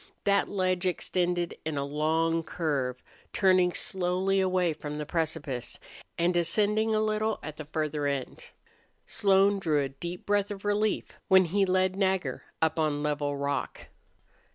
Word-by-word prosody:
That 200 0 +2
ledge 185 -2 0
extended 175 -1 -1
in 155 -2 -3
a 140 - 0
long 160 +3 +1
curve, 140 -7 -2 0.3
turning 185 -2 +4
slowly 190 +1 +1
away 185 -3 +2
from 150 -1 -6
the 150 - -4
precipice, 155 -6 -3 0.4
and 175 +1 +1
ascending 210 +6 +2
a - - +2
little 215 0 0
at 155 0 -7
the 155 - -7
further 150 -1 -2
end. 140 -2 -4 0.6
Slone 195 0 +3
drew 155 -6 +1
a 135 - -3
deep 170 +6 -7
breath 205 0 +1
of 205 -1 -7
relief 205 +1 -1
when 190 -2 +6
he 195 +3 +1
led 185 0 +2
Nagger 190 -8 0 0.2
up 160 0 +1
on 150 -2 0
level 145 -1 -1
rock. 140 0 -3
175 Hz, 150 wpm, -28 LUFS, 150-195 Hz, 0.6 s, when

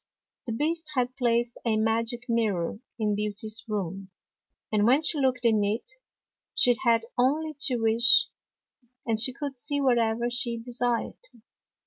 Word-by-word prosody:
The 230 - -2
Beast 310 +5 -2
had 250 0 0
placed 240 -2 0
a 225 -2 +1
magic 230 +2 0
mirror 210 -6 -1 0.2
in 215 -2 0
Beauty's 210 +2 -3
room, 195 -2 -4 0.6
and 210 0 +2
when 270 +6 +4
she 305 -1 +2
looked 255 -2 0
in 220 -3 +3
it, 210 +5 -2 0.6
she 245 -1 +4
had 230 -2 +3
only 305 +5 +1
to 255 - 0
wish, 225 +1 +4 0.8
and 225 -2 0
she 240 +3 +5
could 280 +1 -6
see 285 +3 -2
what 255 -4 +3
ever 230 +1 0
she 240 -1 0
desired. 240 0 -2
235 Hz, 145 wpm, -27 LUFS, 220-255 Hz, 0.8 s, she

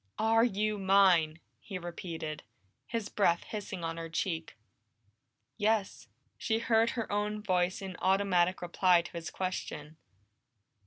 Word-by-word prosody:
"Are 225 +1 +4
you 215 -2 0
mine?" 185 -5 +4 0.2
he 195 - -6
repeated, 170 -3 -6 0.5
his 230 -3 -3
breath 175 -6 +2
hissing 205 -4 -6
on 165 0 -3
her 165 0 -5
cheek. 165 -1 -3 1.0
"Yes." 210 - 0 0.3
She 225 - 0
heard 230 0 +3
her 225 - -3
own 210 +1 -1
voice 185 -1 0
in 190 -1 -6
automatic 185 -2 +2
reply 175 0 +3
to - - -10
his 170 -1 -6
question. 160 -5 -5
190 Hz, 125 wpm, -31 LUFS, 170-210 Hz, 1.0 s, Are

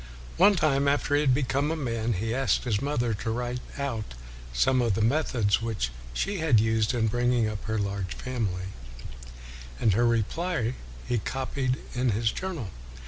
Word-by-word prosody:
One 200 +3 +6
time, 140 -5 +2
after 145 0 +1
he 145 - +4
had 140 -3 +3
be 140 - +1
come 140 +3 0
a 160 - 0
man, 115 -6 -1
he 110 +4 -2
asked 135 +1 +1
his 110 -4 0
mother 120 -5 0
to 110 +2 -3
write 120 +2 -2 0.2
out 115 - -3 0.4
some 125 - +3
of 115 -5 +2
the 110 - 0
methods 115 -5 +2
which 110 - -2 0.2
she 195 - -2
had 155 -9 +4
used 110 +1 +2
in 115 -2 +2
bringing 120 0 +2
up 105 -1 -4
her 110 0 -1
large 100 -2 -2
family, 100 -8 -3 1.1
and 110 - +3
her 120 +4 +3
reply 120 - 0 0.3
he 120 - +1
copied 130 +2 -2 0.2
in 125 0 +1
his 110 +1 +1
journal. 165 - -4
120 Hz, 175 wpm, -27 LUFS, 110-135 Hz, 1.1 s, One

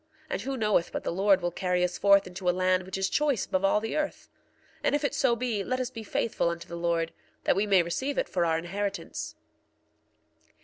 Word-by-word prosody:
And - - -1
who 265 +4 -3
knoweth 210 -6 +2
but - - -4
the - - -1
Lord 195 +1 +3
will 175 - 0
carry 180 0 0
us 180 - -1
forth 200 0 +5
into 180 0 -3
a 180 +1 0
land 185 0 +2
which 190 - -4
is 190 0 +1
choice 285 -1 +1
above 185 +1 -1
all 195 +2 +4
the 225 +1 -4
earth? 305 -1 -3 0.5
And - - +2
if 295 - -1
it 285 - 0
so 250 -3 +3
be, 230 -4 -1
let 255 +5 -1
us 255 - -2
be 225 - -7
faithful 215 -4 0
unto 170 0 -5
the 170 - -7
Lord, 170 -1 0 0.3
that - - +3
we 200 +2 +1
may 190 -3 +5
receive 265 +12 -2
it - - +1
for 175 - 0
our 165 -1 +2
inheritance. 195 +4 -4
195 Hz, 225 wpm, -28 LUFS, 180-225 Hz, 0.5 s, forth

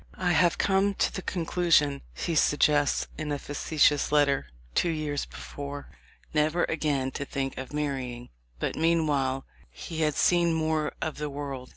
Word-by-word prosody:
"I 180 -1 +1
have 175 0 +3
come 195 +1 +2
to - - +1
the 190 - -4
conclusion," 165 -6 +2
he 170 - -2
suggests 145 -1 +3
in 155 -1 -3
a 145 - 0
facetious 145 +1 +1
letter, 145 - +3 0.3
two 175 - +2
years 150 -3 -2
before, 145 0 -8 0.4
"never 155 +3 +2
again 145 -4 0
to 140 - -4
think 135 -1 -3
of 130 - -7
marrying." 135 -5 -3 0.3
But - - -2
meanwhile 150 -5 +1 0.2
he 160 -1 -6
had 150 -2 +2
seen 170 -2 +3
more 155 -1 0
of 160 -2 -4
the 150 0 -2
world. 140 -3 -6
150 Hz, 155 wpm, -28 LUFS, 140-160 Hz, 0.4 s, have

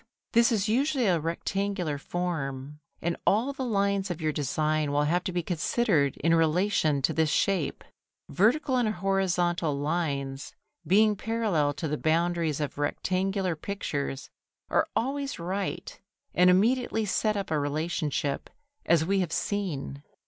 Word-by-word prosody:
This 235 +2 +4
is 215 -2 +1
usually 260 +3 +1
a 180 -4 +3
rectangular 175 0 -2
form, 145 -4 -4 0.2
and 170 0 0
all 235 +7 +3
the 270 - -4
lines 200 -4 0
of 175 -2 -4
your 155 -1 0
design 150 +1 0
will 145 +1 +2
have 175 +4 +1
to - - -1
be 175 -1 -1
considered 170 - +1
in 165 - +4
relation 160 -3 +2
to - - +2
this 160 -1 +2
shape. 185 -2 0 0.4
Vertical 255 - +2
and 240 -3 +2
horizontal 175 -5 0
lines 140 -3 -2 0.3
being 210 +2 +4
parallel 200 -11 0
to 160 +2 -3
the 150 0 -2
boundaries 165 -1 +1
of 145 -1 -4
rectangular 185 +4 -1
pictures, 145 -6 -4 0.4
are - - +3
always 275 +3 -1
right 185 +3 -4 0.3
and 180 +1 +5
immediately 225 +4 +2
set 210 +1 0
up 195 -4 -4
a 155 - +2
relationship, 145 -1 -2 0.4
as 165 -1 +4
we 195 +2 +1
have 175 -4 -1
seen. 165 -10 -3
175 Hz, 140 wpm, -28 LUFS, 150-200 Hz, 0.4 s, and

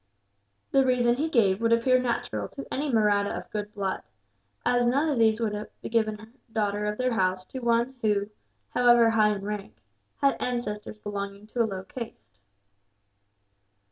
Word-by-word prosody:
The 270 - +5
reason 250 -2 +3
he 300 +6 -1
gave 210 -8 +3
would 230 0 +2
appear 255 +2 +4
natural 245 -2 -2
to 275 - -8
any 290 +2 -1
Mahratta 205 -3 +2
of - - -9
good 210 -1 -4
blood, 195 -2 -2 0.6
as 245 -1 +3
none 280 +6 +2
of 275 -5 0
these 220 -1 +4
would 220 -3 0
have 210 +1 -5 0.2
given 220 -2 0
a 220 - -12 0.2
daughter 210 -1 0
of 210 0 -2
their 255 -1 +1
house 185 -3 0
to 260 - -7
one 235 +1 +1
who, 205 -1 +1 0.4
however 240 -2 +5
high 215 -2 +4
in 195 - -7
rank, 205 - -5 0.4
had 275 0 +2
ancestors 215 -4 -3
belonging 200 -1 -5
to 240 - -1
a - - +4
low 190 -3 -4
caste. 190 - -9
220 Hz, 170 wpm, -27 LUFS, 205-245 Hz, 0.6 s, The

